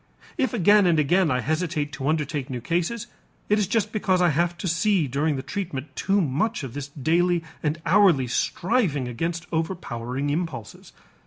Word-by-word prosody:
If 260 - 0
again 205 -2 +5
and 170 -2 +3
again 165 +4 +3
I 125 -2 +1
hesitate 155 +1 -1
to 135 -1 -4
undertake 150 -3 -1
new 125 -2 -3
cases, 175 - -1 0.4
it 210 +1 +3
is 205 - +1
just 215 0 0
because 190 -4 +1
I 175 -1 +4
have 170 +3 0
to 175 - -4
see 165 0 +2
during 145 +4 0
the 130 - -4
treatment 145 -3 -5
too 200 +1 +1
much 160 - 0
of 130 -4 -6
this 145 -1 -5
daily 165 +5 +1 0.2
and 155 +1 -1
hourly 175 -6 +5
striving 150 - 0
against 165 +8 -3
overpowering 145 -6 -2
impulses. 150 -8 -5
165 Hz, 170 wpm, -24 LUFS, 140-185 Hz, 0.4 s, again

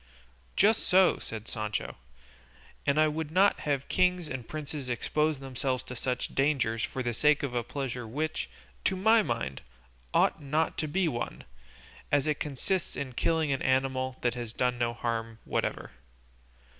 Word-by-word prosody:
"Just 215 +3 +4
so," 185 -1 +5
said 110 0 -7
Sancho; 105 -1 -3 0.9
"and 140 +2 +3
I 155 - +6
would 155 0 -2
not 190 +5 +4
have 140 -2 -1
kings 180 -2 +2
and 130 -4 -5
princes 150 -3 -5
expose 150 +5 +1
themselves 130 -1 -2
to 125 - -8
such 125 +1 -2
dangers 130 -6 +1
for 130 - -2
the 120 -1 -1
sake 150 +5 +3
of 135 -3 -2
a 120 - +1
pleasure 125 -1 -4
which, 155 +7 -2 0.4
to 190 - +3
my 220 +4 +5
mind, 115 - -2 0.5
ought - - +3
not 150 +3 0
to 155 - 0
be 180 +4 +1
one, 120 -6 -3 0.7
as 145 -2 +3
it 150 -1 +1
consists 155 +5 -1
in 135 -2 -4
killing 160 +3 +1
an 135 - 0
animal 130 0 +1
that 120 - +1
has 120 -2 -5
done 125 -1 0
no 120 -1 0
harm 115 -1 -2
whatever." - - -2
135 Hz, 160 wpm, -29 LUFS, 120-155 Hz, 0.9 s, I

